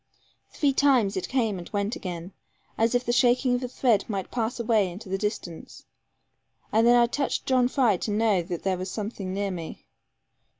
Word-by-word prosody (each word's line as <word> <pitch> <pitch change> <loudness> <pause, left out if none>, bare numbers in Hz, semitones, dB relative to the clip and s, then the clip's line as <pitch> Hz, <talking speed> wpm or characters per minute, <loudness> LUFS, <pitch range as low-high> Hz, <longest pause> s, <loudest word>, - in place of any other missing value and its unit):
Three 285 -2 +1
times 260 -8 +3
it 185 - -3
came 225 -7 0
and 175 - -9
went 205 +2 -2
again, 175 0 -6 0.4
as 225 +1 +1
the 245 0 +1
shaking 250 +1 +3
of 245 - 0
a 250 - -3
thread 235 -4 +2
might 195 -3 -4
pass 235 0 -2
away 220 -4 +2
into 190 +3 -10
the 195 - -1
distance; 190 -5 -5 0.9
and 225 +2 +4
then 240 - +6
I 240 0 +6
touched 275 +4 -2
John 255 -2 +3
Fry 245 -7 +2
to 215 - -4
know 210 -3 +2
that 175 0 -6
there 190 -2 0
was 185 +1 -4
something 205 -2 -5
near 200 +1 -2
me. 170 -3 -7
220 Hz, 185 wpm, -26 LUFS, 190-245 Hz, 0.9 s, then